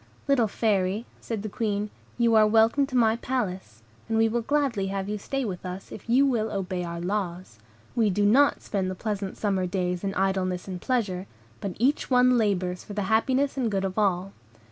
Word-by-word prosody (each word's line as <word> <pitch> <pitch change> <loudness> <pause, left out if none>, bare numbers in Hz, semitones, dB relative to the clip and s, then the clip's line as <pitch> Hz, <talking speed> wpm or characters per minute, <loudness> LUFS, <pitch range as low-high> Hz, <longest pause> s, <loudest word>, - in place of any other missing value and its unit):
"Little 265 -5 +3
Fairy," 205 0 0
said 220 -3 -4
the - - -3
Queen, 210 -1 -2 0.3
"you 235 -1 +3
are 215 -1 +6
welcome 225 +6 +4
to 260 - -6
my 225 -1 +4
palace; 190 - -3 0.3
and 225 - +1
we 225 0 +4
will 235 +2 0
gladly 250 -6 0
have 195 0 -3
you 210 0 -3
stay 270 +5 -2
with 185 -5 -5
us, 185 +1 -7
if 215 - -10
you 260 +4 +5
will 225 -5 0
obey 185 -2 -2
our 170 0 -5
laws. 180 - -3 0.4
We 225 -3 +3
do 205 +2 +1
not 270 +8 +4
spend 190 -3 -1
the 185 - -4
pleasant 200 -1 -4
summer 195 -3 0
days 180 -1 -2
in 195 -1 -2
idleness 190 -1 0
and 180 -2 -5
pleasure, 200 -8 -1 0.3
but 195 -3 -4
each 265 +6 +1
one 250 -1 +5
labors 185 -4 0
for 205 - -9
the 205 0 -1
happiness 265 +5 +2
and 245 -4 +1
good 195 -2 -1
of 190 -1 -3
all. 195 -1 +1
205 Hz, 200 wpm, -26 LUFS, 185-230 Hz, 0.4 s, are